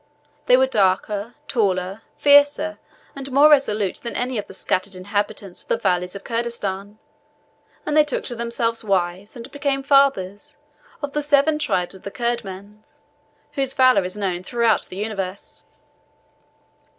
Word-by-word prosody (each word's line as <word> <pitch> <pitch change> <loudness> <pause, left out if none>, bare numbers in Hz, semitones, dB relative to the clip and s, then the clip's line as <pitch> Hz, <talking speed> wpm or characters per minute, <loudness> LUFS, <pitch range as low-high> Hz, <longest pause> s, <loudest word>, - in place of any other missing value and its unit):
They 250 - +7
were 260 - +4
darker, 205 -1 0
taller, 195 -3 -1 0.2
fiercer, 290 +2 +4 0.4
and 275 -1 -6
more 290 +3 +6
resolute 215 -9 +2
than 235 - -6
any 245 -1 -1
of - - -6
the - - -11
scattered 190 +1 -1
inhabitants 205 0 -3
of - - -17
the - - +1
valleys 180 -2 -1
of 200 - -8
Kurdistan; 210 -4 -3 0.9
and 300 - -1
they 305 - +7
took 295 - -3
to 240 - -5
themselves 235 0 -1
wives, 190 0 -1
and 240 +2 -9
became 280 -1 -1
fathers 270 -9 +2 0.5
of 285 -1 -4
the 295 - 0
seven 295 +1 +3
tribes 180 -13 -1
of 190 - -13
the - - -6
Kurdmans, 210 -3 -5 0.5
whose 270 -2 -2
valour 255 -6 +5
is 185 +3 -4
known 185 -4 -2
throughout 230 +2 +1
the 185 - -9
universe." 200 -2 -5
225 Hz, 150 wpm, -22 LUFS, 195-270 Hz, 0.9 s, They